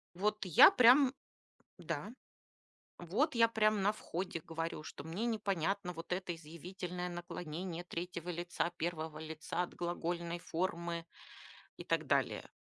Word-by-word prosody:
Вот 210 +2 0
я 180 -5 +9
прям 255 +2 +7 0.7
да. 170 +4 -4 0.9
Вот 230 - 0
я 230 -1 +6
прям 215 -2 +2
на 205 +2 +3
входе 180 -4 -4
говорю, 165 -1 -4
что - - -8
мне 180 +8 -2
непонятно 200 -4 -1
вот 165 +2 -9
это 180 -2 -1
изъявительное 180 +3 -6
наклонение 175 0 -5
3 175 0 -5
лица, 175 0 -1
1 160 -2 -3
лица 160 +2 -3
от 175 - -7
глагольной 170 0 -2
формы 170 -1 -2 0.7
и - - -8
так - - 0
далее. - - +1
175 Hz, 130 wpm, -35 LUFS, 165-195 Hz, 0.9 s, я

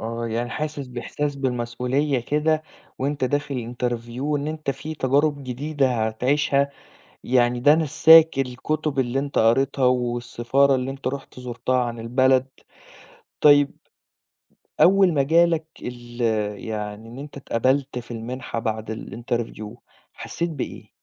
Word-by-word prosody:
آه، 115 +1 -4
يعني 115 +2 -2
حاسس 150 0 -4
بإحساس 140 +4 -4
بالمسؤولية 125 +2 -1
كده، 155 +4 0 0.4
وأنت 140 0 -1
داخل 130 -3 -2
interview 120 0 -3
وإن 145 0 -1
أنت 155 -3 -3
في 155 +3 -6
تجارب 145 +1 +1
جديدة 130 -3 0
هتعيشها، 140 +4 +1 0.5
يعني 120 -1 +2
ده 145 +4 +6
نساك 160 0 +6
الكتب 135 +3 -2
اللي 130 +1 +1
أنت 140 0 -2
قريتها 130 +4 +3
والسفارة 125 +2 +1
اللي 130 0 -1
أنت 135 -1 -9
رُحت 135 -1 -7
زُرتها 125 +1 -1
عن 120 -1 -5
البلد، 130 +2 +3 1.0
طيّب، 145 -1 +6 1.1
أول 190 -1 +6
ما 140 -3 +2
جا 165 +4 +5
لك 165 -2 -1 0.2
ال 120 0 -8 0.4
يعني 105 0 -5
إن 125 +3 -10
أنت 145 0 -9
اتقبلت 130 +1 0
في 120 - -11
المنحة 120 +1 -5
بعد 110 0 -3
الinterview، 115 -1 -5 0.4
حسيت 170 0 -4
بإيه؟ 145 -5 -6
130 Hz, 130 wpm, -23 LUFS, 120-145 Hz, 1.1 s, ده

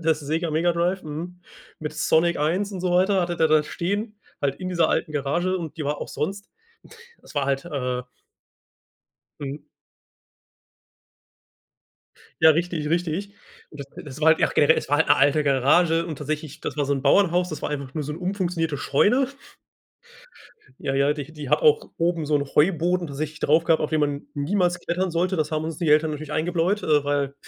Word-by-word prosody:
das 160 -2 +1
Sega 160 +3 -2
Mega 165 +3 +2
Drive, 175 +3 0
hm, 170 +4 -7 0.4
mit 150 -1 -5
Sonic 160 +2 +2
1 185 +7 0
und 185 - -5
so 180 -1 -1
weiter, 190 +2 +3
hatte 175 -1 -2
der 160 - +3
da 155 -1 +4
stehen, 205 +7 -3 0.2
halt 140 -1 0
in 185 - -5
dieser 170 -3 +2
alten 155 -1 -1
Garage 170 +7 0
und 165 -3 -6
die 155 - -4
war 145 +1 -2
auch - - -5
sonst 195 +6 -4 0.7
es - - -16
war 140 -1 +1
halt, 135 +2 -1
äh 125 -5 -3 1.4
Mhm. 140 +1 -5 2.8
Ja 160 - +8
richtig, 165 -1 -1
richtig. 175 +3 -1 0.4
D - - -11
das 140 - -7 0.2
das 145 +1 -9
war 160 - +4
halt 160 - +5
ach - - -2
generell, 150 +2 +5
es - - -6
war 145 0 +2
halt 160 - +2
'ne 145 - +6
alte 145 +2 +3
Garage 160 +5 +3
und 155 -4 -5
tatsächlich, 155 +1 -5
das - - -5
war 145 - +1
so 140 - 0
'n 135 - -4
Bauernhaus, 180 +3 +3
das 155 - -7
war - - -2
einfach 140 -2 -5
nur 150 -2 -2
so'n 150 - -4
umfunktionierte 180 -4 -2
Scheune. 245 - +2 1.5
Ja, 135 - -2
ja, 140 +2 +3
die 150 0 -7
die 150 -3 -8
hat 150 - +3
auch 150 -1 +3
oben 170 -1 0
so 150 0 +2
'n 140 - -1
Heuboden, 175 +1 +2
tatsächlich 150 +2 -5
drauf 160 +3 +3
gehabt, 165 -2 +2
auf 150 - -2
den 155 - +1
man 145 -1 -1
niemals 175 +4 0
klettern 180 +2 -2
sollte. 175 +3 0
Das 155 -1 -1
haben 155 0 -1
uns 160 -1 -4
die 165 - -1
Eltern 155 +1 +4
natürlich 150 0 -7
eingebläut, 175 +5 0
äh, 150 -2 +3
weil 140 -1 -1
160 Hz, 190 wpm, -24 LUFS, 145-175 Hz, 2.8 s, Ja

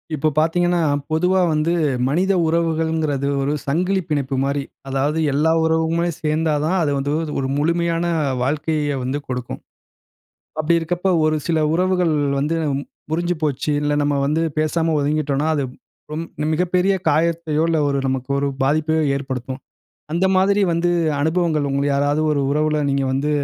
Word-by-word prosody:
இப்ப 155 +2 +1
பார்த்தீங்கன்னா, 175 +3 +2 0.3
பொதுவா 180 +4 +2
வந்து 155 +2 +1 0.3
மனித 185 +7 +1
உறவுகள்ங்கிறது 160 -3 0
ஒரு 140 +2 0
சங்கிலிப் 180 +5 0
பிணைப்பு 140 -3 -1
மாரி. 140 +1 -1 0.3
அதாவது 140 +4 0
எல்லா 155 +3 +2
உறவுமே 160 +1 +1
சேர்ந்தா 155 0 0
தான் 180 +4 +1
அது 150 -3 +1
வந்து 140 +1 -2 0.3
ஒரு 135 - -1
முழுமையான 170 +2 0 0.4
வாழ்க்கையை 150 +1 -1
வந்து 130 +3 -2
கொடுக்கும். 125 -1 -4 1.0
அப்பிடி 165 +2 +2
இருக்கப்ப 175 +3 -1
ஒரு 155 0 +2
சில 165 -2 +1 0.2
உறவுகள் 180 -2 +1 0.2
வந்து 150 +4 0 0.5
முறிஞ்சு 175 +2 0
போச்சு. 150 0 -1
இல்ல 145 0 0
நம்ம 145 0 +1
வந்து 155 +3 +1 0.2
பேசாம 160 +1 +1
ஒதுங்கிட்டோன்னா, 145 0 0
அது 145 -2 0 0.5
ரொம் 160 +2 -3 0.3
மிகப்பெரிய 180 +3 +2
காயத்தையோ! 160 0 +1
இல்ல 165 -1 +1
ஒரு 140 - 0
நமக்கு 130 0 -2
ஒரு 140 - 0
பாதிப்பையோ! 155 +3 +1
ஏற்படுத்தும். 130 -1 -5 0.5
அந்த 170 +4 +1
மாதிரி 200 +2 +3
வந்து 170 +1 +1 0.3
அனுபவங்கள் 160 -2 +1
உங்கள 140 +1 0
யாராவது 145 +2 +1
ஒரு 145 - 0
உறவுல 150 +1 +1
நீங்க 140 0 +1
வந்து 140 +3 0
155 Hz, 140 wpm, -20 LUFS, 145-170 Hz, 1.0 s, மாதிரி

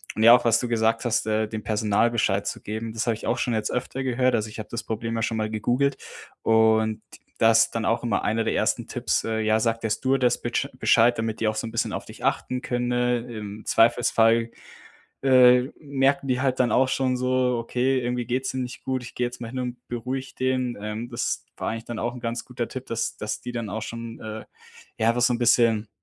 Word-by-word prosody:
Und 110 - 0
ja, 115 +1 +10
auch 120 - +1
was 115 -1 +3
du 125 - -2
gesagt 115 0 +1
hast, 115 -1 +1
äh, 110 0 +1
dem 110 -1 -6
Personal 110 +1 +1
Bescheid 100 -4 +1
zu - - -4
geben, 110 +2 -5
das 115 0 -2
habe 115 - +3
ich - - -9
auch 120 - +1
schon 120 - -1
jetzt 110 -1 -1
öfter 130 +2 -3
gehört. 130 0 +1
Also, 110 0 -1
ich 105 - -10
habe 105 - -6
das 115 - -4
Problem 115 +1 -3
ja 115 - -1
schon 110 0 -1
mal 110 0 -1
gegoogelt. 125 +6 0 0.4
Und 110 -1 +3 0.4
das 115 0 +5
dann 115 -1 -3
auch 115 +1 +1
immer 115 -4 0
einer 110 +1 +1
der - - 0
1. - - 0
Tipps, - - -1
ja: 110 -1 +1
„Sagt 115 0 -1
der 110 - 0
Stewardess 130 +3 +1
bitsch - - -1
Bescheid, 120 +1 +4
damit 115 -1 -2
die 110 - +2
auch 110 - -3
so 110 +1 -3
'n 115 - -7
bisschen - - -1
auf - - -4
dich - - -12
achten 125 0 -1
können.“ 125 0 -1
Im 105 -2 -7
Zweifelsfall, 115 0 +3 0.7
äh, 125 -2 +6 0.2
merken 140 -1 +1
die 130 0 +1
halt 130 -1 0
dann 125 - +3
auch 130 +1 +3
schon 130 -1 0
so: 125 -1 +1
„Okay, 125 +3 0
irgendwie 125 0 -2
geht's 130 +2 -1
dir 130 - -4
nicht 125 -1 -5
gut, 130 -1 -2
ich 125 - -10
gehe 125 - +1
jetzt 120 0 -8
mal 115 - -5
hin 130 +2 -6
und 125 -1 -5
beruhige 130 +3 -4
den.“ 130 -2 0
Ähm, 105 +3 -5
das 120 0 -2
war - - -3
eigentlich 115 +1 -5
dann 120 -2 -5
auch 120 +1 -2
'n 125 - -9
ganz 115 0 -3
guter 120 -2 -4
Tipp, 130 0 -7
dass 115 -1 -2
dass 110 0 -4
die - - -6
dann 115 -3 -4
auch 110 +1 -4
schon 115 0 -7
äh, 110 0 -7 0.5
ja, 110 - +2
einfach 120 +1 +2
so 125 - +4
'n 120 - -1
bisschen 115 -2 +3
115 Hz, 235 wpm, -25 LUFS, 110-125 Hz, 0.7 s, ja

